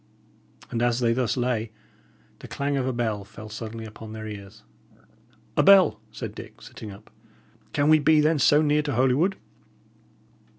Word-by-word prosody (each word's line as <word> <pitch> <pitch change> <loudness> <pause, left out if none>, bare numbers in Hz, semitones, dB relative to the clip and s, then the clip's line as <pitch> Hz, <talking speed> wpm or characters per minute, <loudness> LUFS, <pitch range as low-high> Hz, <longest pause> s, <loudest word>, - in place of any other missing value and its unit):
And 115 - -2
as 120 0 +2
they 115 -2 +2
thus 120 -2 -1
lay, 120 -3 -1 0.7
the - - -10
clang 140 0 -2
of 130 -2 -1
a - - +1
bell 110 -4 -2
fell 110 +1 -11
suddenly 110 +1 -7
upon 110 0 -10
their 110 0 -7
ears. 105 0 -9 0.9
"A - - +4
bell!" 185 - +6
said - - -6
Dick, - - -11
sitting 110 - -10
up. 100 0 -13 0.6
"Can 145 0 +1
we 155 0 +6
be, 155 +1 +4
then, 155 0 +3
so 145 +3 +5
near 150 0 +2
to 145 -2 -3
Holywood?" 135 - +2
120 Hz, 165 wpm, -25 LUFS, 110-145 Hz, 0.9 s, bell